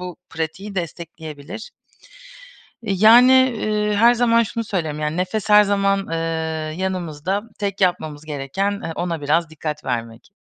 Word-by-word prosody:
bu 180 -1 -7
pratiği 165 +6 -5
destekleyebilir. 165 0 -7 1.1
Yani, 225 +5 +6 0.2
eee, 210 -1 0
her 235 +3 +6
zaman 235 -1 +3
şunu 230 +1 -4
söylerim, 160 -8 -3
yani 150 +1 -2
nefes 185 +4 -2
her 210 0 +8
zaman, 200 -1 +1
eee, 165 - -1 0.6
yanımızda, 185 0 -2 0.2
tek 200 -1 -3
yapmamız 155 -5 0
gereken, 160 +8 -2
eee, 165 - -3
ona 170 -2 -2
biraz 155 +3 +1
dikkat 155 -1 -5
vermek. 115 +2 -4
180 Hz, 130 wpm, -21 LUFS, 155-205 Hz, 1.1 s, her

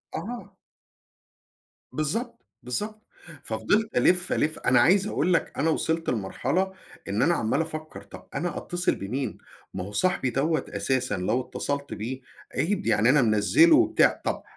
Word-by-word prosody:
آه. 240 +3 -7 1.4
بالضبط، 225 - -3 0.2
بالضبط. 210 - -4 0.4
ففضِلت 205 - 0
ألِف، 180 0 +4
ألِف، 155 +1 0
أنا 125 -1 +3
عايز 190 +10 +4
أقول 180 - +1
لك 165 - 0
أنا 160 +3 +1
وصلت 160 +1 0
لمرحلة 135 - -1 0.4
إن 100 +3 0
أنا 175 - +4
عماّل 115 +7 0
أفَكّر 155 -1 -6
طَب - - -13
أنا 175 0 -2
أتّصل 175 +1 -1
بمين، 120 +5 -4 0.4
ما 95 - -4
هو 100 - -8
صاحبي 180 - +1
دوّة 155 +5 0
أساسًا 130 -6 -1
لو 110 +8 0
اتصلت 140 +2 -4
بيه، 125 +6 -5 0.3
عيب، 200 +4 0
يعني 115 +4 +3
أنا 145 0 +5
منزّله 120 - +5
وبتاع، 340 - +3
طَب - - -2
155 Hz, 145 wpm, -26 LUFS, 120-185 Hz, 1.4 s, أنا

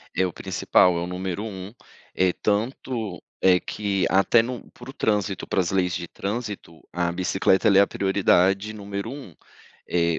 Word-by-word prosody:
É 95 - +2
o 90 - -2
principal, 90 -1 +2
é - - -2
o - - -2
número 95 +2 -4
1, 100 -1 -7 0.4
eh, 95 -1 +3
tanto 110 -1 -2 0.2
é 90 -1 +5
que 100 -3 -2
até 100 +5 +4
no 125 +1 -7
para 120 +2 -12
o - - -8
trânsito, 105 -3 -1
para - - -1
as 90 -1 0
leis 90 -2 +1
de 85 -1 -4
trânsito, 105 -6 -5
a 85 0 0
bicicleta 95 +3 +2
ela 100 -1 +6
é - - +8
a 100 - +4
prioridade 95 +1 +2
número 100 +2 -5
1, 135 - -10 0.5
eh 85 -2 +1
95 Hz, 175 wpm, -24 LUFS, 90-105 Hz, 0.5 s, é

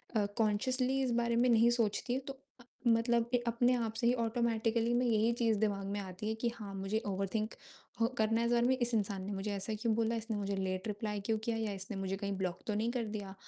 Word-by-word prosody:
अ, 210 - +3
consciously 255 +5 +1
इस 255 - 0
बारे 235 0 +1
में 240 +2 +4
नहीं 230 0 +5
सोचती 235 0 0
हूँ 260 - -1
तो 275 - -3 0.3
अ, - - -14 0.2
मतलब 230 0 +3
के 245 - +4
अपने 245 +2 +3
आप 230 -2 -1
से 235 - +3
ही 240 - +5
ऑटोमेटिकली 230 0 +1
मैं 245 +1 +2
यही 225 0 +3
चीज़ 225 -2 +3
दिमाग 200 -2 0
में 205 +1 -2
आती 195 +2 -5
है 220 - -1
कि 240 - +3
हाँ, 205 -4 -7
मुझे 195 +3 -1
ओवरथिंक 200 +2 -2 0.5
ह 230 - +5
करना 225 +1 +2
है 235 - +1
इस 240 - +2
बारे 240 +1 +3
में। 260 - +3
इस 240 -1 +2
इंसान 200 -3 0
ने 205 - -4
मुझे 195 +2 -3
ऐसा 200 +3 -3
क्यों 230 -2 +2
बोला, 230 0 +1
इसने 225 -1 -3
मुझे 200 0 -2
लेट 190 +1 -2
रिप्लाई 210 0 -3
क्यों 220 0 +1
किया 230 0 -1
या 220 -2 -1
इसने 195 +2 -5
मुझे 195 0 -2
कहीं 200 0 -3
ब्लॉक 185 -1 -2
तो 215 - 0
नहीं 225 +3 0
कर 245 -1 -1
दिया, 195 -2 -5
220 Hz, 250 wpm, -33 LUFS, 205-235 Hz, 0.5 s, नहीं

